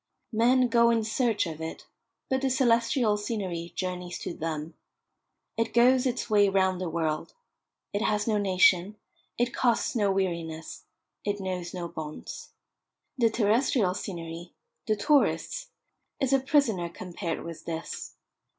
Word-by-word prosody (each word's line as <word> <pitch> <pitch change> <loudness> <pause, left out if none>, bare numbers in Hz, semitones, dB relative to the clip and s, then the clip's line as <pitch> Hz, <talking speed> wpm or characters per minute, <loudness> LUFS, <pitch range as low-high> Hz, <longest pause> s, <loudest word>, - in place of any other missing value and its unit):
Men 250 +3 +4
go 235 0 +4
in 230 -1 +2
search 225 -1 +1
of 160 -2 -6
it; 160 0 -6 0.4
but 265 0 0
the 270 - +1
celestial 235 -3 +3
scenery 190 -6 -3
journeys 180 -1 -3
to - - -4
them. 155 0 -4 0.8
It 230 0 -1
goes 250 +2 +5
its 250 0 -2
way 205 -2 +4
round 190 -1 +2
the 180 - -2
world. 160 -1 -2 0.6
It 205 - 0
has 210 -1 +1
no 215 -2 +2
nation, 190 0 +4 0.4
it 240 0 0
costs 245 -1 +1
no 205 -4 +2
weariness, 170 -4 -3 0.4
it 205 0 -1
knows 185 -2 -4
no 175 -1 -3
bonds. 160 -3 -7 0.7
The 230 -2 +5
terrestrial 220 -2 +2
scenery 170 -3 -6 0.3
the 215 - +3
tourist's 300 - +1 0.5
is 270 0 +1
a 270 - +5
prisoner 255 - +2
compared 170 -1 -5
with 165 -1 -8
this. 165 0 -5
205 Hz, 140 wpm, -28 LUFS, 170-235 Hz, 0.8 s, goes